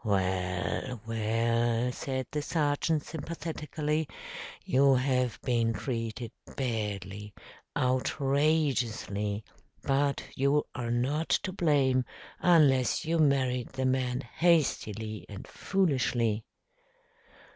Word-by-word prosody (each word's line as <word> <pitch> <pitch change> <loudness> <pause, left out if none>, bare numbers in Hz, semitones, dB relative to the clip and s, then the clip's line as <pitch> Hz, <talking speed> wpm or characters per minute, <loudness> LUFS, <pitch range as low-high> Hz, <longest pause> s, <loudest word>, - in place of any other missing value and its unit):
"Well, 95 +3 -1
well!" 115 +2 +1
said 130 0 -3
the 150 +1 -1
sergeant 150 0 +1
sympathetically, 155 -1 -3 0.6
"you 135 +1 +5
have 125 -2 +1
been 115 -2 +1
treated 115 -1 -4 0.3
badly, 105 -4 -3 0.4
outrageously; 130 -6 +1 0.4
but 140 +1 +1
you 140 +2 +3
are 120 -2 -3
not 135 +7 0
to 185 - -2
blame 140 -7 +3 0.4
unless 145 -8 +4
you 165 +1 +1
married 130 -4 +2
the 130 0 -1
man 130 -1 +1
hastily 115 - 0
and 100 -2 -8
foolishly." 125 - 0
130 Hz, 90 wpm, -30 LUFS, 115-145 Hz, 0.6 s, you